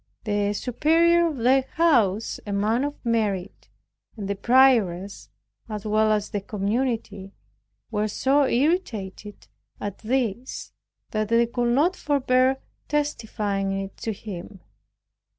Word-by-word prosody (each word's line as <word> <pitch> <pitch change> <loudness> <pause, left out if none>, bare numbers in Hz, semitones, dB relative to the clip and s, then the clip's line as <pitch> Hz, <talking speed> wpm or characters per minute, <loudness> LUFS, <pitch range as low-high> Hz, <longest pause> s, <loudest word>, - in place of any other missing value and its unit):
The 205 -1 0
superior 330 +9 +3
of 310 -4 -4
the 260 +3 +3
house, 230 - +2
a - - -3
man 215 +5 +1
of 290 0 -2
merit, 210 -5 -1 0.5
and 200 -2 -5
the 200 - 0
prioress, 200 - +2 0.4
as 210 -1 -5
well 215 0 +2
as 210 -1 0
the 205 - -2
community, 210 -1 -2 0.6
were 210 0 0
so 270 +6 +2
irritated 230 - -2 0.3
at 205 -2 -5
this, 240 0 -2 0.4
that 215 0 -1
they 230 +1 +4
could 240 0 0
not 340 +7 +3
forbear 265 -3 +2 0.3
testifying 210 -9 -1
it 195 0 -6
to 225 - -3
him. 195 -2 -8
220 Hz, 120 wpm, -24 LUFS, 200-265 Hz, 0.6 s, they